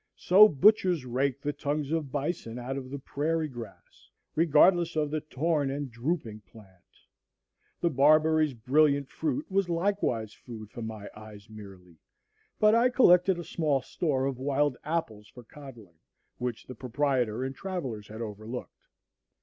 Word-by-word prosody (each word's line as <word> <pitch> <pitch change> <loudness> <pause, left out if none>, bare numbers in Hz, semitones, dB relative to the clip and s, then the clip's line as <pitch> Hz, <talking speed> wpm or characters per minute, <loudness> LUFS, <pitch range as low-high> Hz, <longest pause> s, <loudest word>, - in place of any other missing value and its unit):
So 205 +4 +6
butchers 180 -2 +3
rake 130 +2 -1
the 145 0 -2
tongues 145 0 -3
of 160 -5 -2
bison 140 -5 -3
out 125 +2 -5
of 130 -2 -6
the 140 - -5
prairie 155 +4 -2
grass, 120 -5 -12 0.2
regardless 170 +2 +4
of 150 -2 0
the 155 0 -2
torn 150 0 -1
and 140 -1 -4
drooping 120 -3 -3
plant. 100 -4 -18 1.0
The 170 - +1
barberry's 155 +1 +3
brilliant 140 +3 +2
fruit 295 -1 -2
was 195 -1 +1
likewise 165 - -1
food 110 -4 -11
for 120 - -8
my 110 -2 -7
eyes 105 0 -13
merely; 95 -5 -13 0.6
but 215 0 +5
I 235 +2 +4
collected 185 -7 +4
a 175 - -5
small 150 -5 -1
store 135 -5 -1
of 135 -2 -3
wild 140 0 0
apples 145 -10 -3
for 125 - -14
coddling, 115 - -14 0.4
which 125 -2 -4
the 130 - -9
proprietor 125 -3 -1
and 135 0 -3
travellers 135 - -5
had 110 +2 -9
overlooked. 110 +2 -8
140 Hz, 150 wpm, -28 LUFS, 115-160 Hz, 1.0 s, So